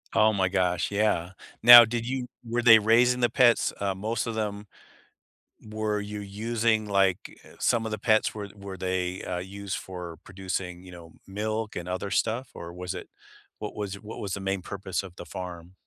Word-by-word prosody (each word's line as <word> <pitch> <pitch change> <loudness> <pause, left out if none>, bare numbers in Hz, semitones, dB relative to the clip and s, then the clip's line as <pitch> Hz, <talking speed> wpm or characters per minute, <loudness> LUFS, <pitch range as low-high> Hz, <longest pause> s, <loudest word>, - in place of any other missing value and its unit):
Oh 110 0 +5
my 95 -2 +1
gosh, 90 -2 0
yeah. 100 -4 0 0.3
Now, 120 0 +12
did 115 +1 -3
you 130 -1 -3 0.2
were 120 +1 -1
they 115 -2 +9
raising 120 +4 +4
the 120 - +3
pets, 125 -3 +4
uh 100 -1 -1
most 110 +4 -2
of 115 - -3
them 105 -1 -3 1.0
were 110 -1 -2
you 105 0 -6
using 110 +2 -1
like, 95 -2 +3 0.3
eh, - - -16
some 115 -1 +1
of 110 - -4
the 110 - -2
pets 110 +1 +2
were 105 -2 -6
were 100 -1 -8
they, 95 0 -2
uh, 90 -1 -3
used 100 +1 -5
for 90 -3 -8
producing, 95 -1 -5
you 95 - -12
know, 85 -2 -13
milk 110 +2 -3
and 90 0 -5
other 95 +2 -3
stuff, 115 +3 0
or 85 0 -8
was 90 +1 -5
it 90 - -8 0.5
what - - -6
was 100 -2 -4
what 105 +2 -9
was 100 -2 -4
the - - -3
main 95 0 -2
purpose 95 0 -4
of 95 -2 -11
the - - -8
farm? 90 -1 -8
100 Hz, 195 wpm, -27 LUFS, 95-110 Hz, 1.0 s, Now